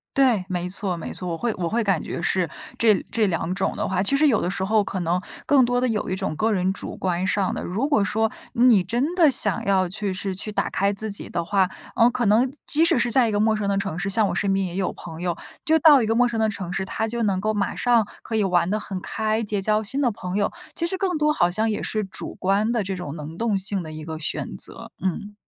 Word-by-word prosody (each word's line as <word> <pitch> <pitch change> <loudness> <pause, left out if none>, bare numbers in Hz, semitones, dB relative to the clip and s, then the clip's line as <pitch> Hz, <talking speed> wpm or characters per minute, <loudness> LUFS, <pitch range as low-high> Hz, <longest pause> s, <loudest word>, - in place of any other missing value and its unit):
对， 255 -8 +3
没 180 -1 -2
错 185 -1 -1
没 165 - -6
错， 180 - -7
我 165 - -3
会 235 +4 -1
我 175 -3 -2
会 230 +4 0
感 195 -6 +1
觉 - - -5
是 180 -1 0 0.3
这 220 -2 +5 0.2
这 220 -2 +2
两 175 -1 -1
种 190 0 -1
的 - - -2
话 185 -1 0
其 275 +8 +4
实 305 +2 +4
有 235 -7 +2
的 175 - -1
时 190 0 -2
候 215 +1 +2
可 190 -1 -4
能 175 +2 0 0.2
更 280 -2 +5
多 245 0 +1
的 255 - +1
有 220 -3 -2
一 185 - -1
种 190 -5 -3
个 220 +8 +1
人 190 -2 +1
主 - - -6
观 180 -1 -1
上 200 -2 0
的 - - -4
如 215 +10 -1
果 285 -9 +2
说 220 +2 0 0.2
你 235 -5 +5
真 245 - -1
的 340 -4 +5
想 205 -7 +2
要 190 -2 +2
去 195 +2 -3
是 190 +1 -3
去 205 +3 -1
打 - - -1
开 200 +1 +1
自 210 +1 -2
己 200 - -1
的 170 -1 -2
话， 190 0 +2 0.3
呃， 235 +1 +5
可 245 0 -1
能 220 +6 +3 0.2
即 310 +2 +2
使 335 - +3
是 240 -1 +1
在 245 -2 +4
一 - - -2
个 205 - 0
陌 220 +1 +3
生 205 -2 -2
的 195 - +1
城 195 -5 -3
市 195 +2 -2
像 205 +1 +3
我 - - -2
身 200 -1 0
边 195 0 0
也 175 -1 -6
有 190 -1 -1
朋 165 -1 -9
友， 175 -2 -2 0.3
就 320 +1 +4
到 290 -3 +7
一 - - 0
个 225 - +1
陌 245 +1 +4
生 235 -2 -3
的 220 0 +2
城 185 -4 -5
市， 190 - -1
他 220 +3 -2
就 235 +1 -3
能 195 -3 +1
够 215 +2 0
马 205 -2 -1
上 235 -4 +2 0.2
可 225 - -4
以 215 - +2
玩 180 -3 +2
得 215 - 0
很 195 -3 -6
开， 220 +2 -1
结 205 -2 -2
交 215 +2 +1
新 265 +7 +1
的 255 - +3
朋 185 -3 -6
友。 205 - +1 0.2
其 335 - -1
实 380 +2 0
更 370 -2 -1
多 300 0 +3
好 175 -11 +2
像 215 +4 0
也 215 - -2
是 215 -1 -1
主 190 - -7
观 200 +4 +1
的 235 -3 0
这 190 0 -3
种 180 -5 -6
能 155 +1 -8
动 225 -1 0
性 195 -1 0
的 155 - -8
一 155 0 -8
个 160 0 -6
选 145 - -3
择， - - +1
嗯。 205 +3 -3
205 Hz, 295 characters per minute, -23 LUFS, 185-230 Hz, 0.3 s, 到